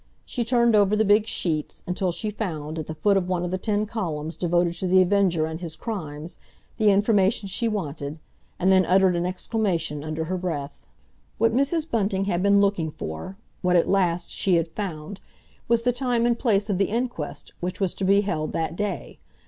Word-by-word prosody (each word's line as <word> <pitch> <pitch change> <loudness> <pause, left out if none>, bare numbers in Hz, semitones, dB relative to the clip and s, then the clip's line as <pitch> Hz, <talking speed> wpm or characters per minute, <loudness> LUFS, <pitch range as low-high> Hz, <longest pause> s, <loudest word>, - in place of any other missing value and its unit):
She 245 - -2
turned 235 -1 +3
over 205 0 +4
the 220 +1 +2
big 210 +2 +4
sheets, 155 -8 -2
until 180 0 -1
she 210 +5 -3
found, 160 -7 -4
at 155 - -5
the 160 - -5
foot 200 +6 +3
of 185 -1 -1
one 180 -1 0
of 175 - -4
the 185 - -1
ten 210 +1 0
columns 165 -8 -4
devoted 175 -1 +1
to 185 - -2
The 185 +1 +5
Avenger 185 -3 +3
and 160 +1 -5
his 165 -3 -5
crimes, 160 -7 -6 0.4
the 215 -1 +5
information 200 0 +3
she 195 +5 -1
wanted, 155 -8 -3 0.4
and 190 +2 +3
then 190 0 +6
uttered 185 0 +4
an 175 +1 0
exclamation 180 -6 -2
under 155 +1 -3
her 185 +3 -2
breath. 145 - -5 0.5
What 225 +1 +2
Mrs. 290 +5 +1
Bunting 195 -6 0
had 175 -3 0
been 200 +1 +4
looking 195 -5 +1
for—what 180 - -4
at 170 - +4
last 180 -3 +1
she 190 -3 +1
had 165 -1 +1
found—was 195 +6 -4
the 245 0 +2
time 245 -2 0
and 235 -1 +1
place 210 -5 +2
of 195 -3 -1
the 200 - +4
inquest 235 -9 -4
which 180 +1 -4
was 190 -3 0
to - - -5
be 200 +2 +4
held 155 -6 -2
that 165 0 -2
day. 205 -2 -4
190 Hz, 195 wpm, -25 LUFS, 165-210 Hz, 0.5 s, then